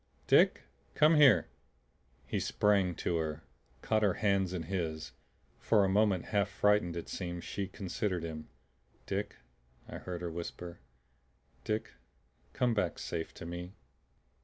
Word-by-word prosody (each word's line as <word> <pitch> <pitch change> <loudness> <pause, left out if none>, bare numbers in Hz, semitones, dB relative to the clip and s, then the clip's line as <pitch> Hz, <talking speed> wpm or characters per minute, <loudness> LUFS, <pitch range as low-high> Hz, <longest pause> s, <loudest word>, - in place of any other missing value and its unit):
Dick - - +4 0.3
come 155 +2 +6
here!" 135 - +6 0.8
He - - -2
sprang 100 -4 +2
to 85 - -1
her, 80 -2 -3 0.4
caught 110 -1 +2
her 100 -4 +2
hands 100 -3 +1
in 90 -3 -3
his. 80 -3 -3 0.5
For 105 -3 +3
a - - +1
moment, 100 -2 +2
half 100 -1 +2
frightened 100 -3 +2
it 85 - -5
seemed, 85 -2 -5
she 100 -1 -3
considered 95 -1 -3
him. 80 -2 -6 0.6
"Dick," - - -3 0.5
I - - -7
heard 90 -1 -6
her 85 - -3
whisper. 85 +1 -7 0.8
"Dick 110 +1 -2 0.6
come 125 -3 +1
back 90 -6 0
safe 80 -1 -4
to - - -8
me!" 85 +2 -7
90 Hz, 135 wpm, -32 LUFS, 85-105 Hz, 0.8 s, come